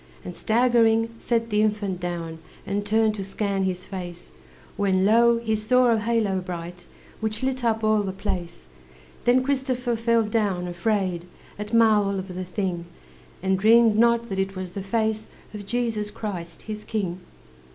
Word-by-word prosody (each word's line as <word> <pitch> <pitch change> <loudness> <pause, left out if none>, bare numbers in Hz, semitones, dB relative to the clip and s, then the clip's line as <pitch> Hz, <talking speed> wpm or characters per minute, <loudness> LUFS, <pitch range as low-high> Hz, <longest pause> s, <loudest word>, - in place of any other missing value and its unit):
And, 180 - -6
staggering, 230 -1 +3
set 230 -1 -1
the 210 0 +3
infant 210 -4 0
down, 170 -2 -4 0.3
And 200 +1 -1
turned 220 0 +3
to 200 -2 -4
scan 195 0 -1
his 185 -1 -3
face; 175 -2 -7 0.4
When, 190 -2 +2
lo! 235 +2 +5
he 225 -1 -1
saw 245 +3 +3
a 225 - +3
halo 215 -4 +1
bright 175 -1 -7 0.3
Which 220 +1 -2
lit 260 -1 -1
up 225 -1 +1
all 215 -1 +3
the 195 -2 -3
place. 180 - -5 0.6
Then 250 +1 +4
Christopher 255 -3 0
fell 230 0 +2
down, 205 -5 0
afraid 180 -1 -1 0.3
At 210 0 -5
marvel 215 -4 +4
of 190 -1 -5
the 185 +1 -4
thing, 180 -1 -3 0.6
And 190 0 +1
dreamed 225 +1 +6
not 235 +1 +3
that 195 -1 -2
it 195 0 -1
was 185 -1 -5
the 195 - -5
face 220 +2 -1 0.3
Of 205 -2 -8
Jesus 225 -2 -1
Christ, 180 -6 -6
his 215 -1 -6
King. 190 -5 -3
210 Hz, 160 wpm, -24 LUFS, 190-230 Hz, 0.6 s, dreamed